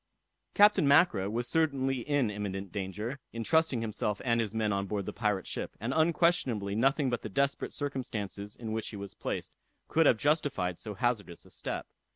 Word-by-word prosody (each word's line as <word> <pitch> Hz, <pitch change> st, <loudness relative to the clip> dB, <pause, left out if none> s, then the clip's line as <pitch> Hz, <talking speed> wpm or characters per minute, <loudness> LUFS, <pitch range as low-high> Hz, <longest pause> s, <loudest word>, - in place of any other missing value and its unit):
Captain 205 Hz, -7 st, +6 dB
Mackra 140 Hz, -, +4 dB
was 120 Hz, +2 st, -1 dB
certainly 135 Hz, -3 st, +1 dB
in 135 Hz, -3 st, +1 dB
imminent 100 Hz, -2 st, -4 dB
danger, 105 Hz, +7 st, -4 dB
in 115 Hz, 0 st, -4 dB
trusting 160 Hz, -4 st, +2 dB
himself 105 Hz, -2 st, -2 dB
and 115 Hz, -1 st, +3 dB
his 110 Hz, -3 st, -2 dB
men 110 Hz, -2 st, 0 dB
on 100 Hz, 0 st, -1 dB
board 100 Hz, -1 st, -2 dB
the -, -, -5 dB
pirate 105 Hz, -3 st, 0 dB
ship, -, -, -5 dB
and 115 Hz, +5 st, -2 dB
unquestionably 160 Hz, -, +2 dB
nothing 135 Hz, +6 st, +2 dB
but 120 Hz, -, -1 dB
the 110 Hz, -, -6 dB
desperate 140 Hz, +7 st, 0 dB
circumstances 110 Hz, -8 st, -4 dB
in 115 Hz, -2 st, -6 dB
which 110 Hz, 0 st, -2 dB
he -, -, -8 dB
was 100 Hz, -1 st, -7 dB
placed -, -, -4 dB, 0.4 s
could 160 Hz, -1 st, +4 dB
have 115 Hz, -, +5 dB
justified 140 Hz, -, 0 dB
so 105 Hz, -2 st, -6 dB
hazardous 105 Hz, -5 st, -2 dB
a -, -, -17 dB
step. -, -, -4 dB
115 Hz, 185 wpm, -30 LUFS, 100-140 Hz, 0.4 s, Captain